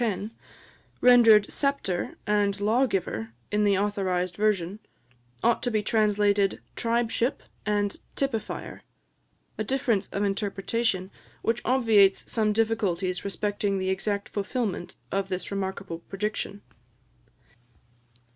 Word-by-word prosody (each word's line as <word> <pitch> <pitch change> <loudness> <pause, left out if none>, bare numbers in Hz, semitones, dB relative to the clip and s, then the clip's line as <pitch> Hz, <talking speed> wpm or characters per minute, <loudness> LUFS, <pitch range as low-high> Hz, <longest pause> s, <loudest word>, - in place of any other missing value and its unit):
10), 215 -2 -1 0.7
rendered 230 -4 +7
"sceptre" 275 -11 0
and 205 -1 +1
"lawgiver" 205 - 0 0.2
in 210 0 +2
the 200 -2 +3
authorised 190 -3 0
version, 205 -2 0 0.6
ought 235 - +3
to 245 - 0
be 215 -3 0
translated 205 -2 +2 0.2
"tribeship" 235 +1 0 0.2
and 205 -1 0 0.2
"typifier," 265 -6 -3 0.8
a - - +1
difference 240 -4 0
of 200 - -2
interpretation 200 0 -1 0.3
which 230 +1 0
obviates 225 -6 +4
some 215 -2 +2
difficulties 200 -5 0
respecting 200 0 -1
the 190 0 0
exact 200 +1 -2
fulfilment 205 -2 -3 0.2
of 195 0 -1
this 185 0 -4
remarkable 190 -3 -4
prediction. 200 +2 -4
205 Hz, 105 wpm, -27 LUFS, 195-225 Hz, 0.8 s, rendered